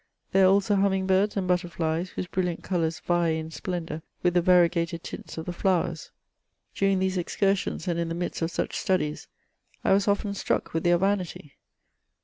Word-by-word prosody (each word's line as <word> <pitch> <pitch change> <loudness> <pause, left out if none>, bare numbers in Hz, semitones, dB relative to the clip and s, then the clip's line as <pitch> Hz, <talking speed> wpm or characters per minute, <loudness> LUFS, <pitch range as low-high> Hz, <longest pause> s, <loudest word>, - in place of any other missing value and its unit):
There 195 0 +5
are - - +6
also 200 +1 +3
humming 190 -1 +2
birds 195 +2 +2
and 190 -2 -1
butterflies, 175 -1 0
whose - - -4
brilliant 180 -1 -2
colours 165 -3 -1
vie 175 -2 +1
in 160 0 -6
splendour 165 0 -4 0.2
with 175 -1 +3
the 175 - +4
variegated 170 -1 +3
tints - - -8
of 160 - -4
the 180 - -4
flowers 175 -3 0 0.6
During 195 -1 +2
these 185 0 0
excursions, 195 +2 0
and 170 -1 0
in 170 -1 -1
the 165 - -3
midst 175 0 -3
of 165 - 0
such - - -3
studies, 175 -6 -1 0.6
I - - +4
was 200 +1 +2
often 200 0 +1
struck 200 - -2
with 165 +1 -1
their 175 0 +5
vanity. 185 -6 -2
180 Hz, 180 wpm, -26 LUFS, 170-190 Hz, 0.6 s, are